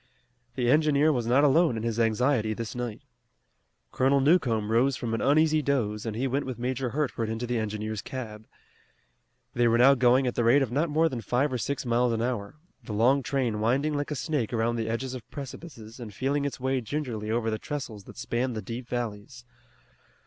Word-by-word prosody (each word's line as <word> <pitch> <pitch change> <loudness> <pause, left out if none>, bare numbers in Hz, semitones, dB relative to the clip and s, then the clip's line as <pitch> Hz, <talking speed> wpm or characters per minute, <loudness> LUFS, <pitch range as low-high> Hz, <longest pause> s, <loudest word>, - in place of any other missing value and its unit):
The 125 -2 0
engineer 150 +2 +4
was 120 -3 -2
not 130 +4 +4
alone 150 -3 +4
in 110 - -4
his 115 -1 -2
anxiety 115 0 +1
this 115 -1 -5
night. 120 -3 -5 0.9
Colonel 135 +2 +3
Newcomb 130 -8 +2
rose 125 +4 +3
from 120 -2 -4
an 115 - -1
uneasy 155 +2 +3
doze 115 -7 -1
and 110 - -3
he 125 +4 -1
went 135 +2 -1
with 130 -3 -4
Major 125 +1 -2
Hertford 120 -4 -2
into 115 +2 -3
the 120 -1 -1
engineer's 110 0 -3
cab. 110 -4 -7 1.1
They 120 -2 +2
were 115 0 +3
now 130 +3 +7
going 125 0 +4
at 125 - 0
the 120 - 0
rate 130 +5 +5
of 125 - -4
not 150 +6 +1
more 160 +2 +3
than 125 -7 -4
five 130 +4 0
or 125 - -1
six 140 +3 -3
miles 120 0 +2
an 115 - -1
hour, 120 -2 -3 0.3
the 110 - -6
long 125 +6 +3
train 125 -4 -1
winding 135 +8 +1
like 145 0 -2
a 150 - -2
snake 145 -6 -2
around 115 0 0
the 115 -1 -2
edges 125 +3 -3
of 125 -4 -9
precipices 130 -5 -9
and 115 -3 -7
feeling 140 +7 -1
its 140 - -4
way 130 0 0
gingerly 115 -5 -4
over 115 0 0
the 110 - -2
trestles 115 -9 -6
that - - -13
spanned 120 0 -2
the 110 - -3
deep 120 0 -6
valleys. 120 0 -5
125 Hz, 205 wpm, -27 LUFS, 115-140 Hz, 1.1 s, now